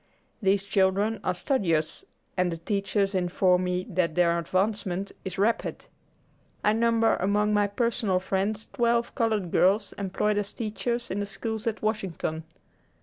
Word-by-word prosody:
These 195 0 +2
children 200 +2 +1
are 180 - 0
studious, 175 - 0 0.3
and 180 -1 +1
the 165 - -3
teachers 200 +3 0
inform 180 0 +2
me 180 0 -1
that 180 -6 0
their 170 -1 +3
advancement 190 +1 -1
is 190 0 -5
rapid. 215 +4 0 0.8
I 210 - +4
number 230 0 +3
among 210 +3 +1
my 205 -1 +3
personal 205 -3 0
friends 200 +3 -2
twelve 235 0 +1
colored 215 -6 0
girls 200 +2 +3
employed 205 +2 0
as 205 -1 -4
teachers 235 +1 -3
in 195 - -1
the 205 - -2
schools 220 +2 -4
at 220 -1 -2
Washington. 180 -7 -2
200 Hz, 145 wpm, -27 LUFS, 185-215 Hz, 0.8 s, I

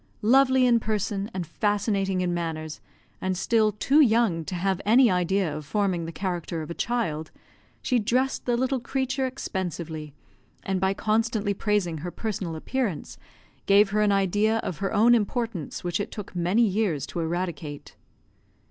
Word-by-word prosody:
Lovely 260 +2 +5
in 240 -2 +4
person, 210 -2 -2
and 185 -4 -4
fascinating 200 +1 0
in 180 -1 0
manners, 160 -3 -4 0.4
and 185 -1 -1
still 215 +2 +2
too 265 +8 +2
young 220 - +3
to 185 - -4
have 190 +1 0
any 235 +2 +5
idea 180 -2 +1
of 155 - -6
forming 180 +1 -1
the 165 - -5
character 170 -2 -3
of 155 - -7
a - - -2
child, 170 -10 -2 0.5
she 250 -2 +2
dressed 250 +6 0
the 240 -1 +2
little 260 +1 0
creature 265 +2 -1
expensively; 170 - -5 0.5
and, 190 -1 -1
by 190 +1 +1
constantly 215 -1 0
praising 195 -6 0
her 175 +4 -5
personal 185 -4 -4
appearance, 210 - -3 0.5
gave 200 0 +5
her 210 +1 +2
an 210 -1 +3
idea 205 +3 +2
of 170 - -4
her 195 - -1
own 225 +3 +5
importance 225 - -1
which 175 +1 -1
it 205 - -3
took 205 -3 -8
many 180 +7 +2
years 195 -8 0
to - - -6
eradicate. 165 -3 -4
195 Hz, 160 wpm, -26 LUFS, 175-225 Hz, 0.5 s, Lovely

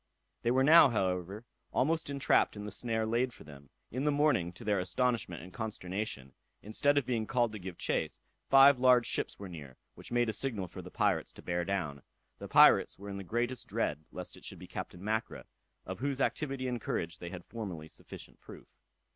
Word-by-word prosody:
They 115 - 0
were 130 +2 +3
now, 155 0 +8
however, 95 0 -2 0.3
almost 160 +3 +1
entrapped 140 -5 +2
in 105 - -6
the 105 - -6
snare 110 +1 -1
laid 120 +3 0
for - - -13
them. 70 -2 -14 0.2
In 130 +4 -2
the 150 - +3
morning, 145 - +2
to 90 - -11
their 105 -3 +1
astonishment 95 -2 -1
and 90 0 -12
consternation, 95 - -4 0.3
instead 145 +7 +2
of 140 - +2
being 115 -3 -1
called 120 -3 +1
to 110 - -7
give 90 -2 -7
chase, - - -1 0.3
five 135 -1 +8
large 125 -2 +5
ships - - -1
were 100 - -7
near, 75 -7 -10 0.2
which - - -12
made 120 0 +2
a 110 - -1
signal 105 -4 -1
for 85 - -9
the - - -10
pirates - - 0
to - - -14
bear 85 0 -1
down. 85 -7 -2 0.4
The - - -7
pirates - - +6
were 100 +1 -9
in 100 - -5
the 100 - -6
greatest 120 +5 -2
dread 75 +1 -2
lest - - -7
it - - -16
should - - -6
be - - -10
Captain 90 - -7
Mackra, 110 +2 -2 0.4
of 95 +2 -6
whose 135 +1 -2
activity 135 -2 -1
and 120 -2 -3
courage 85 -2 -3
they 85 - -6
had 90 -1 -8
formerly 95 -9 -6
sufficient - - -11
proof. - - -12
110 Hz, 205 wpm, -32 LUFS, 90-125 Hz, 0.4 s, now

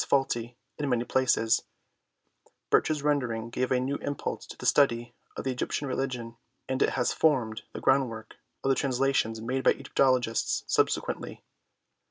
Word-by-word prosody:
faulty 120 -3 0 0.2
in 145 -2 -1
many 120 -2 +1
places, 120 -3 +2 1.1
Birch's 155 -2 +2
rendering 120 -6 0
gave 130 +2 -1
a 130 - +3
new 135 +3 -1
impulse 145 -1 -4
to - - -10
the - - -8
study 120 -4 +3 0.2
of - - -4
the 130 - -1
Egyptian 130 +3 -2
religion, 125 -3 -3 0.3
and 130 +1 -2
it - - +4
has 125 - +1
formed 125 -8 +1
the - - -6
groundwork 125 -5 0 0.3
of 135 - +1
the 135 - +4
translations 130 -4 +1
made 130 +3 -2
by - - +5
Egyptologists 130 -4 +1
subsequently. - - -1
130 Hz, 150 wpm, -28 LUFS, 115-135 Hz, 1.1 s, by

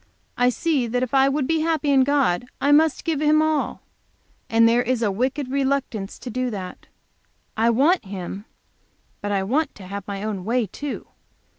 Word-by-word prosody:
I 245 0 +3
see 275 -1 0
that 245 +2 -1
if 255 - -4
I 270 0 +5
would 280 0 0
be 320 +3 +1
happy 310 -2 +1
in 270 -1 +5
God, 255 -7 +1
I 285 - +2
must 310 0 +4
give 320 -3 -1
Him 305 0 +4
all. 310 -1 0 0.7
And 230 0 +5
there 235 +1 +4
is 245 -1 -1
a 205 - +2
wicked 255 +5 -2
reluctance 270 -7 -1
to 245 - -8
do 255 +2 -1
that. 190 -5 -7 0.7
I 225 +2 +3
want 280 - +3
Him 195 +1 -6 0.8
but 205 - -3
I 195 -1 +1
want 280 +9 0
to 195 - -11
have 200 +2 -7
my 200 0 -5
own 210 -4 -3
way, 235 +3 +1
too. 285 +9 -6
255 Hz, 185 wpm, -23 LUFS, 215-285 Hz, 0.8 s, I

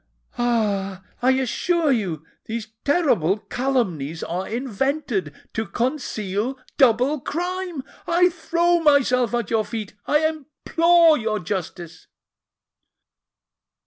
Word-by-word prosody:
Ah! 200 -6 0 0.2
I 260 +2 +4
assure 295 +5 +1
you 180 - -1 0.2
these 220 -1 -5
terrible 270 - +2
calumnies 200 - -2
are 180 +3 -3
invented 245 - -2 0.2
to 220 -1 -2
conceal 235 -1 -2 0.2
double 260 +3 +3
crime! 355 0 -3 0.2
I 355 +1 +4
throw 345 0 +1
myself 255 -6 +3
at 235 -3 -2
your 220 -1 +2
feet,—I 220 +8 -1
implore 320 +2 +3
your 220 -1 -1
justice!" 175 -3 -5
245 Hz, 95 wpm, -23 LUFS, 205-305 Hz, 0.2 s, I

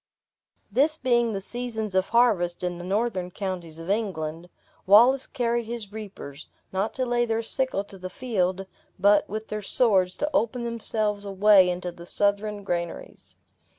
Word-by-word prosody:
This 290 +8 +2
being 240 -4 +2
the 195 -2 -3
seasons 220 -2 -4
of 190 0 +1
harvest 205 -8 +2
in 175 -1 -2
the - - -7
northern 190 -1 -1
counties 180 -4 -5
of 165 0 -9
England, 175 -6 -3 0.4
Wallace 245 +7 +6
carried 235 -3 -1
his 230 -4 -5
reapers, 195 -9 -9 0.3
not 195 +3 -1
to 255 - -1
lay 240 0 +1
their 225 -1 -1
sickle 260 -3 0
to 195 -1 -12
the 185 0 -6
field, 190 -4 -1 0.3
but, 200 +2 +4
with 215 +1 -5
their 215 0 -3
swords, 195 -4 +2
to 295 - -1
open 235 +2 0
themselves 215 -3 -1
a 200 - -5
way 195 -1 +6
into 180 0 -3
the 170 0 -13
Southron 205 +1 0
granaries. 170 -3 -5
205 Hz, 160 wpm, -25 LUFS, 185-235 Hz, 0.4 s, Wallace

